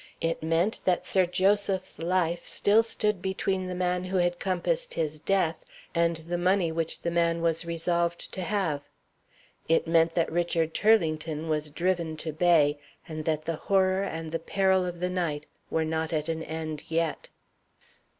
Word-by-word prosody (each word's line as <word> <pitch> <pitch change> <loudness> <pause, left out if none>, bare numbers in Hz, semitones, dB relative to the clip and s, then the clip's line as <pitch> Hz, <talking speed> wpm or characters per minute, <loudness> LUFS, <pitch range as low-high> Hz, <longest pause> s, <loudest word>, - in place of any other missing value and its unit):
It 165 0 -1
meant 165 +6 +1
that 180 -2 +2
Sir 185 -2 +3
Joseph's 190 0 +1
life 170 0 0
still 210 +2 +3
stood 210 -4 -1
between 190 0 -1
the 180 - -4
man 180 0 0
who 185 +1 -1
had 175 0 +1
compassed 485 - -1
his 155 -1 -2
death 165 -1 +1 0.4
and 170 -1 +2
the 170 +2 -4
money 180 -1 +2
which 165 0 -3
the 170 - -1
man 170 0 +2
was 165 0 0
resolved 170 +1 -1
to 190 - -5
have. 180 -7 -1 0.9
It 165 - +3
meant 165 0 +3
that 170 - +1
Richard 165 -1 0
Turlington 160 -7 +2
was 150 -1 0
driven 170 0 -1
to 155 0 -5
bay, 155 -3 +3 0.3
and 155 -1 -6
that 155 -1 -1
the 165 -1 -2
horror 190 +1 +2
and 165 -4 -4
the 165 - -1
peril 190 +1 +2
of 175 -1 -6
the 180 - 0
night 160 -5 -2 0.2
were 160 0 0
not 160 0 -2
at 155 -1 -1
an 160 0 -2
end 160 -1 -5
yet.) 165 -1 -1
170 Hz, 170 wpm, -28 LUFS, 160-185 Hz, 0.9 s, Sir